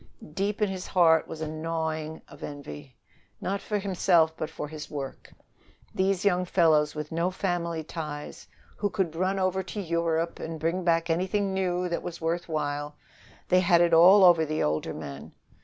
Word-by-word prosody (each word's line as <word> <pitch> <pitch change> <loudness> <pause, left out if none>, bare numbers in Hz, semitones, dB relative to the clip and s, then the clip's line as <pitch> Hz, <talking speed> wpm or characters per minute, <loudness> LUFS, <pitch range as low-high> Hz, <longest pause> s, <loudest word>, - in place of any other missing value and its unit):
Deep 205 +4 -1
in - - +3
his 190 -1 -5
heart 165 -3 +4
was 160 - -8
a 160 - -2
gnawing 160 0 -3
of - - -15
envy 75 - -8 0.4
not 195 +1 -2
for 210 - -2
himself, 175 -5 +2
but 155 - -4
for 160 - -6
his 155 0 -8
work. 140 -3 -7 0.6
These 190 0 0
young 180 -2 +3
fellows 160 -4 +3
with 150 0 -5
no 170 +2 0
family 175 -3 -2
ties, 150 -2 -7 0.3
who 205 - 0
could 190 -6 -2
run 185 +3 0
over 190 0 0
to 190 +3 -7
Europe 170 -2 -1
and 160 0 -5
bring 165 +4 -1
back 165 -1 +2
anything 190 +3 0
new 180 -1 0
that 170 - -2
was 175 -1 -6
worth 170 +1 -2
while, 145 -1 -3 0.5
they 185 - +5
had 175 -2 +4
it 170 -1 +3
all 185 +5 +8
over 175 -3 +7
the 155 0 -1
older 75 +1 -1
men. 70 0 -8
170 Hz, 175 wpm, -27 LUFS, 155-185 Hz, 0.6 s, all